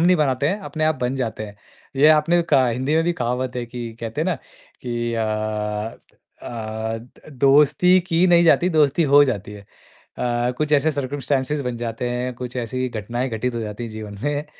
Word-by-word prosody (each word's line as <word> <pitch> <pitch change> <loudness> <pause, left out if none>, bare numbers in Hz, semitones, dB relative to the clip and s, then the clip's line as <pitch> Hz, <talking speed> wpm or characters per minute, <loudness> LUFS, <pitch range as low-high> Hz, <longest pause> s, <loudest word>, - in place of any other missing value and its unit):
नहीं 180 +2 +5
बनाते 140 -2 +1
हैं, 200 +5 -1
अपने 155 -5 -3
आप 155 - +2
बन 125 +2 -1
जाते 115 -4 -3
हैं। 105 0 -12 0.4
ये 150 +3 +6
आपने 160 +3 +4
कहा 140 -6 +3
हिंदी 130 +5 -1
में 165 +1 +3
भी 175 - +1
कहावत 125 -1 -2
है 120 - -2
कि 120 +1 -7 0.2
कहते 115 +5 -4
हैं 160 - 0
ना 185 - +1 0.5
कि 120 -1 -2
अ 115 -1 0 1.2
अ, - - -7 0.5
द 125 +6 -16
दोस्ती 150 +6 +5
की 175 0 +2
नहीं 175 -1 +5
जाती, 170 +2 +4
दोस्ती 150 +2 +4
हो 145 +1 +7
जाती 105 -5 -3
है। 105 - -10 0.6
अ, 120 0 0
कुछ 150 0 -1
ऐसे 150 +2 +4
सर्कम्स्टैंसेज़ 140 0 -1
बन 125 -1 -3
जाते 115 +1 -3
हैं, 125 +1 -2
कुछ 125 +1 -7
ऐसी 130 +2 -2
घटनाएँ 120 +3 -3
घटित 120 +1 -2
हो 115 - -2
जाती 110 +2 -5
हैं 115 - -7
जीवन 110 -1 -8
में, 145 0 -1
130 Hz, 195 wpm, -22 LUFS, 120-150 Hz, 1.2 s, हो